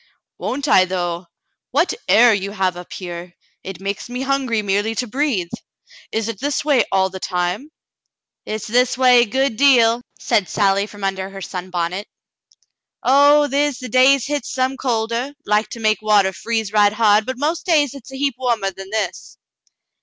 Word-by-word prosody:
"Won't 285 +3 -3
I, 185 -8 +5
though! 175 -1 -3 0.4
What 310 +7 +1
air 240 0 +6
you 200 0 -3
have 190 -3 0
up 180 0 -11
here! 175 -1 -8 0.3
It 190 -2 -8
makes 200 +4 -5
me 250 +2 -4
hungry 265 -5 0
merely 205 +3 0
to 250 - -1
breathe. 240 - -1 0.6
Is 220 0 -2
it 225 -4 -5
this 285 +1 -2
way 285 -5 +3
all 190 -1 +2
the 190 - -7
time 180 +7 -2
^ - - -17 0.4
" - - -67
"Hit's 215 -1 -5
this 250 +3 +1
a - - -14
way 250 -2 +6
a - - +2
good 260 +1 -1
deal," 245 -4 +4 0.2
said 210 -6 0
Sally, 200 0 +1
from 205 -1 -12
under 190 -1 -2
her 195 0 -9
sunbonnet. 180 +1 -4 1.0
"Oh, 285 +3 +5
the' 280 -1 -2
is 290 -2 +1
days 255 +1 +3
hit's 290 0 -3
some 260 0 -1
colder, 240 +2 -2
like 210 +1 +1
to 235 - -8
make 215 -2 +1
water 205 -3 +3
freeze 220 +2 -3
right 205 -1 +4
hard, 215 0 +3
but 260 -1 -4
most 310 +6 -2
days 295 -6 +3
hit's 270 -2 -12
a 265 - -8
heap 280 0 0
warmer 230 -6 0
than 195 +1 -10
this." 210 -4 -4
220 Hz, 185 wpm, -19 LUFS, 195-260 Hz, 1.0 s, air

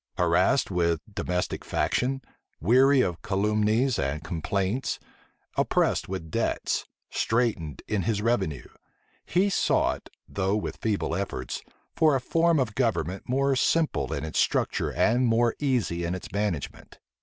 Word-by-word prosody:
Harassed 90 +8 +3
with 85 -3 +1
domestic 90 -3 -2
faction, 135 +1 0 0.4
weary 130 - +5
of 85 -7 -1
calumnies 105 +4 +1
and 70 +1 -2
complaints, 95 - -1 0.6
oppressed - - +1
with 95 -4 -5
debts, - - -1 0.2
straitened 105 - 0
in 105 -2 0
his 105 +3 0
revenue, 105 - 0 0.6
he 185 +3 +2
sought, 195 - +1 0.2
though 100 +1 0
with 105 - -3
feeble 95 -7 -1
efforts, 75 -10 -4 0.3
for 155 -3 +4
a - - +2
form 165 +5 +2
of 120 -5 0
government 100 - -1
more 135 +1 +2
simple 160 +4 +1
in - - -2
its 80 - -2
structure - - +1
and 120 +3 +2
more 115 0 +3
easy 120 -12 0
in 85 +2 -1
its 95 - -8
management. 100 -6 -3
105 Hz, 130 wpm, -27 LUFS, 90-125 Hz, 0.6 s, weary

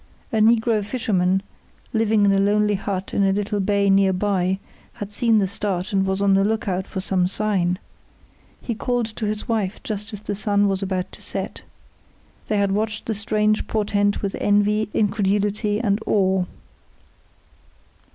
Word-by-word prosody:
A - - +2
negro 225 0 +3
fisherman, 195 -5 0 0.5
living 220 -2 +3
in 200 - +4
a 195 - +3
lonely 210 +1 +2
hut 195 -1 -3
in 200 - +2
a 195 - +3
little 205 +1 -1
bay 200 0 +1
near 195 0 +4
by, 190 -1 0 0.4
had 205 0 -7
seen 230 0 +3
the 200 -2 +2
start 195 -1 -3
and 195 -1 +2
was 190 +1 0
on 200 -1 +4
the 195 0 +4
lookout 200 -3 -1
for 190 - -5
some 185 -1 +1
sign. 185 -3 0 0.9
He 235 - -2
called 245 +1 -1
to 220 0 -4
his 210 0 -3
wife 215 -3 -1
just 210 +1 -4
as 210 -2 -7
the 205 - -4
sun 205 0 +2
was 195 -1 0
about 185 -2 -2
to - - -8
set. - - -5 0.9
They 215 - 0
had 200 -1 +2
watched 210 +1 -2
the 225 - -1
strange 215 0 +1
portent 205 -1 0
with 195 -1 -2
envy, 205 +1 +2
incredulity, 205 0 0
and 205 -3 +1
awe. 190 -2 +2
205 Hz, 165 wpm, -22 LUFS, 195-215 Hz, 0.9 s, in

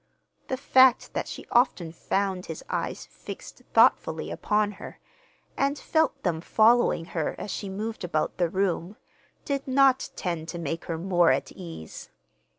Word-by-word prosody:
The 260 - -2
fact 260 -2 +4
that - - -2
she - - -8
often 235 -9 +2
found 190 +2 -2
his 160 - -7
eyes - - -3
fixed - - -10
thoughtfully - - +3
upon 210 0 0
her, - - -9 0.6
and 280 +1 0
felt 315 0 0
them 165 -4 0
following 220 -3 +3
her 160 -3 -1
as 205 - -5
she 200 - -4
moved 215 +3 -5
about 160 -3 -1
the 175 -2 +2
room, 190 +1 -1 0.5
did 275 -1 -2
not 265 0 +3
tend 170 -4 -3
to 170 - -5
make 165 0 -4
her 165 - -3
more 175 -1 +3
at - - -1
ease. 165 - -9
195 Hz, 155 wpm, -26 LUFS, 170-245 Hz, 0.6 s, fact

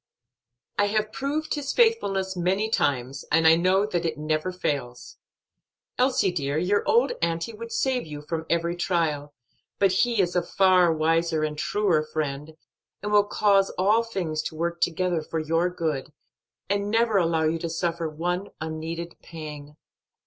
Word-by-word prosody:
"I 205 - +5
have 215 +1 0
proved 290 +5 -2
His 290 -2 -3
faithfulness 195 - +2
many 190 +5 0
times, 135 - 0
and 165 +1 +3
I 160 0 +8
know 185 +4 +3
that 180 -5 -2
it 160 -2 -2
never 155 +3 -1
fails. 140 -9 -4 0.8
Elsie, 250 -7 +3
dear, 145 -4 -2
your 185 +5 +2
old 245 +4 +4
auntie 170 +6 -1
would 230 +2 -8
save 255 -7 0
you 150 -1 -8
from 160 +1 -4
every 170 +1 0
trial, 155 -5 -1 0.4
but 195 -2 +3
He 230 +4 +2
is 180 -2 +1
a 180 - +3
far 180 -1 +4
wiser 160 0 +1
and 155 0 -2
truer 180 0 +1
friend, 155 0 -4 0.5
and 210 - -2
will 205 -1 +5
cause 200 -2 +3
all 210 +5 +4
things 180 -9 -3
to - - -4
work 170 +1 -3
together 175 -1 +1
for 160 +1 -5
your 165 +3 +1
good, 155 -6 -3 0.6
and 200 0 0
never 225 -1 +2
allow 165 -2 +1
you 160 +1 +1
to 170 - -3
suffer 165 0 -2
one 175 +5 -2
unneeded 160 +2 -5
pang." 150 -2 -9
170 Hz, 160 wpm, -25 LUFS, 155-200 Hz, 0.8 s, I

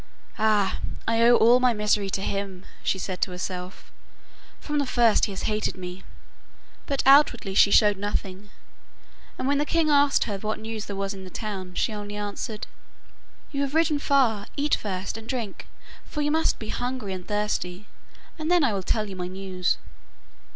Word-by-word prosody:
'Ah, 210 -3 +2 0.3
I 230 0 +2
owe 240 +1 +7
all 240 +2 +6
my 250 -1 +3
misery 210 -2 +1
to 195 0 -2
him,' 195 -2 -4 0.2
she - - 0
said 185 -1 -5
to - - +2
herself. 180 0 -6 0.7
'From 295 -1 -2
the 285 - 0
first 235 -4 +4
he - - -5
has 190 - -5
hated 215 -2 -1
me,' 180 0 -7 0.9
but 275 -1 0
outwardly 265 -7 +5
she 200 - +6
showed 205 0 +5
nothing. 200 0 -4 0.9
And 255 - -2
when 285 0 +2
the - - +3
king 315 0 +1
asked 285 0 +4
her 205 -3 -4
what 215 +2 -2
news 220 -1 -5
there 200 - -4
was 195 +1 -2
in 190 -1 -9
the 185 - -9
town 190 -3 -6
she 225 - 0
only 205 0 -6
answered: 210 +1 -4 0.9
'You 280 -2 -2
have 280 +1 -2
ridden 320 -2 +3
far; 250 -8 +2
eat 290 +1 0
first, 195 0 -2
and 225 +1 -10
drink, 235 -7 -4 0.4
for 300 - -3
you 295 - +1
must 320 +1 +2
be 220 - -7
hungry 245 -5 -3
and 185 -1 -7
thirsty, 210 -2 -2 0.5
and 310 +1 -2
then 350 -3 +4
I 245 -6 +2
will 195 - -1
tell 215 +3 0
you 195 - -7
my 180 -1 -4
news. 185 -1 -2
210 Hz, 185 wpm, -25 LUFS, 195-255 Hz, 0.9 s, owe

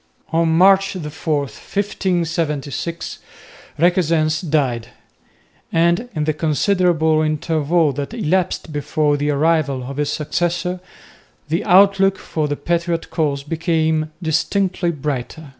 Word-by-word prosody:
On 165 0 +3
March 190 +4 +4
4, 155 -3 -2
1576, 170 -3 -3 0.6
Requesens 160 -2 +2
died; 140 -9 0 0.8
and 170 +8 +2
in 155 - 0
the 155 0 +1
considerable 160 0 +2
interval 155 0 +1
that 140 +1 -4
elapsed 185 -6 -1
before 145 0 0
the 145 +1 -1
arrival 145 -3 +1
of 135 +2 -7
his 150 -1 0
successor, 175 +3 -1 0.7
the 165 +6 0
outlook 195 +1 +5
for 155 -2 -3
the 145 - -2
patriot 170 -1 -2
cause 145 -4 -1
became 160 0 0
distinctly 180 +3 0
brighter. 150 -1 -4
160 Hz, 110 wpm, -19 LUFS, 150-175 Hz, 0.8 s, outlook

